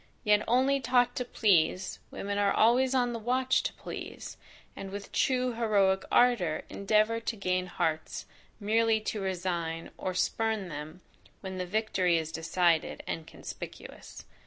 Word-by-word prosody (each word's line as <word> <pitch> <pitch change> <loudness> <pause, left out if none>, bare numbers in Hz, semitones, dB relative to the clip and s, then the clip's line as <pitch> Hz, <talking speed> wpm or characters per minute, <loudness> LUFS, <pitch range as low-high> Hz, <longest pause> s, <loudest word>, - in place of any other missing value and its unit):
Yet 210 -2 +4
only 265 +4 +3
taught 245 -1 +2
to 250 - -1
please, 185 -5 +2
women 200 0 -3
are 200 -1 +3
always 250 +4 +3
on 245 -2 +2
the 230 - -4
watch 255 +3 +1
to - - -3
please, - - -8 0.4
and 195 - -7
with 200 +1 -7
true 255 -1 +1
heroic 200 -4 +2
ardour 235 -11 +3
endeavour 215 +3 +2
to 230 0 -3
gain 185 -2 -1
hearts 160 -2 -2 0.3
merely 225 +1 +2
to 215 -1 -3
resign, 170 -3 -3
or 185 -1 -3
spurn 220 +1 0
them, 155 +3 -8 0.4
when 190 -1 -6
the 180 - -3
victory 185 -4 +1
is 160 -1 -3
decided, 165 0 +1
and 160 -1 -4
conspicuous. - - -9
200 Hz, 145 wpm, -29 LUFS, 180-230 Hz, 0.4 s, Yet